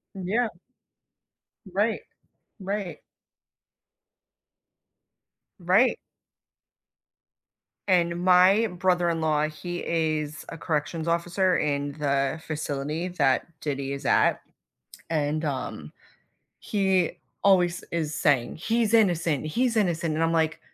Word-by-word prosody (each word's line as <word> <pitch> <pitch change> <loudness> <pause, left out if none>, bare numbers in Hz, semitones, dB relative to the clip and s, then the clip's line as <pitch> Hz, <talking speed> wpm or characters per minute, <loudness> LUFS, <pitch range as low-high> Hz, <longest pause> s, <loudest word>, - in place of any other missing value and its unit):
Yeah. 200 +6 0 1.2
Right. 210 +5 0 0.6
Right. 195 -1 -4 2.6
Right. 185 +8 +3 1.9
And 175 -2 +2
my 185 +4 +5
brother-in-law, 170 -5 +1
he 175 +3 -6
is 155 -2 -1
a 165 - -7
corrections 160 +1 -2
officer 175 +2 +1
in 145 -1 -1
the 140 0 -1
facility 155 +2 -3
that 135 -7 +1
Diddy 140 -2 -3
is 140 0 -7
at, - - +3 0.7
and, 155 0 0
um, 130 - -4 0.7
he 190 -4 +1 0.3
always 180 -3 +3
is 160 -3 -2
saying, 140 -5 +1
"He's 225 +5 0
innocent. 175 - +2
He's 235 +9 0
innocent." 170 -5 0
And 160 - +1
I'm 165 - +1
like, 160 -1 +1
170 Hz, 95 wpm, -26 LUFS, 150-185 Hz, 2.6 s, my